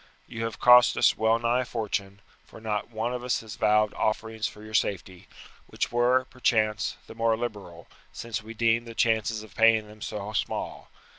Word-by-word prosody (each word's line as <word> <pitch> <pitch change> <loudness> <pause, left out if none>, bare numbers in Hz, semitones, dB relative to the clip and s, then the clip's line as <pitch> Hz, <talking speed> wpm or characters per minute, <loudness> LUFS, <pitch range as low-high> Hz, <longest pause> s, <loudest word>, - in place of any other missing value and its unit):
You 115 0 -5
have 115 -1 -5
cost 125 0 +7
us - - +4
well 110 +1 +2
nigh 120 +2 +1
a - - -1
fortune, 100 -4 -4 0.2
for - - -14
not 110 -1 -3
one 115 +2 -3
of 125 -1 -5
us 125 - 0
but 110 -1 -11
vowed 105 +1 +2
offerings 110 0 -2
for 105 - -12
your 110 0 -11
safety, 95 -3 -2 0.4
which - - -3
were, 125 +2 +2
perchance, 110 -5 0
the - - -11
more 115 0 +1
liberal, 100 -8 -6 0.3
since 115 -2 -5
we 110 +1 -10
deemed 115 +1 +1
the 115 - -9
chances 110 -1 +1
of 105 -4 -15
paying 110 0 +4
them 105 0 -15
so 105 0 -5
small. - - -3
110 Hz, 190 wpm, -27 LUFS, 105-115 Hz, 0.4 s, cost